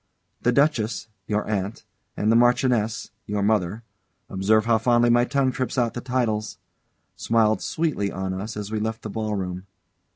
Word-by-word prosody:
The 125 - +3
Duchess, 120 -5 +1 0.2
your 105 0 0
aunt, 100 0 -3 0.3
and 105 +2 +2
the - - +4
Marchioness, 120 -2 +2 0.2
your 105 -1 -1
mother 105 +1 0 0.5
observe 105 +3 +2
how 115 -1 +3
fondly 120 +1 +3
my 120 +1 +4
tongue 135 0 +1
trips 130 +1 -3
out 120 -2 +1
the 120 - -5
titles 120 -4 -1 0.6
smiled 110 -1 +2
sweetly 155 -12 -1
on 95 +1 -3
us 105 +3 -5
as 105 0 -5
we 110 - -1
left 110 +1 -3
the 110 - -5
ball 110 0 -2
room. 90 -1 -4
110 Hz, 165 wpm, -24 LUFS, 105-120 Hz, 0.6 s, the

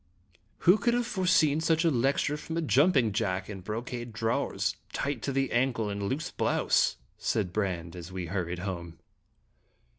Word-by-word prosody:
"Who 185 +5 +6
could 235 +3 +2
have 245 0 +1
foreseen 175 -7 +3
such 160 +1 +2
a 165 - +4
lecture 135 +3 +1
from 160 +2 -5
a - - +1
jumping 140 -5 +4
jack 95 -3 -1
in 95 -2 -7
brocade 120 +4 -5
drawers, 115 +1 -1 0.2
tight 140 -4 -2
to 140 - -2
the 135 -1 0
ankle, 120 -4 +1
and 100 0 -4
a - - -1
loose 135 +9 -2
blouse?" - - +2 0.2
said 95 -5 -1
Brande, 90 -5 -2
as 85 0 -8
we 90 -1 -4
hurried 90 0 -3
home. 85 -3 -5
120 Hz, 170 wpm, -29 LUFS, 95-150 Hz, 0.2 s, Who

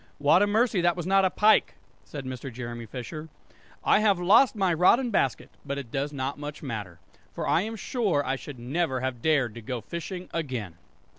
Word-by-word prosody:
"What 145 +6 +4
a 205 - +4
mercy 220 -2 +2
that 175 0 +2
was 175 - -4
not 195 +1 +4
a - - +3
pike!" 210 +3 +3 0.3
said 145 -3 -7
Mr. 130 +1 -6
Jeremy 120 -1 -7
Fisher. 150 +7 -7 0.5
"I - - +4
have 205 -4 +3
lost 215 +8 +5
my 190 -4 +2
rod 180 +8 +5
and 250 -3 -2
basket; 135 - 0
but 140 -1 -4
it 130 -5 -7
does 140 +2 -2
not 140 0 -4
much 145 +1 -7
matter, 105 - -6 0.4
for - - -3
I 165 - +3
am 220 +3 -4
sure 200 - 0
I 130 - 0
should 135 0 -9
never 130 +2 -1
have 130 -2 -3
dared 140 -7 +2
to 120 - -9
go 125 +2 -4
fishing 180 - -6
again!" 125 - -3
150 Hz, 205 wpm, -27 LUFS, 130-185 Hz, 0.5 s, lost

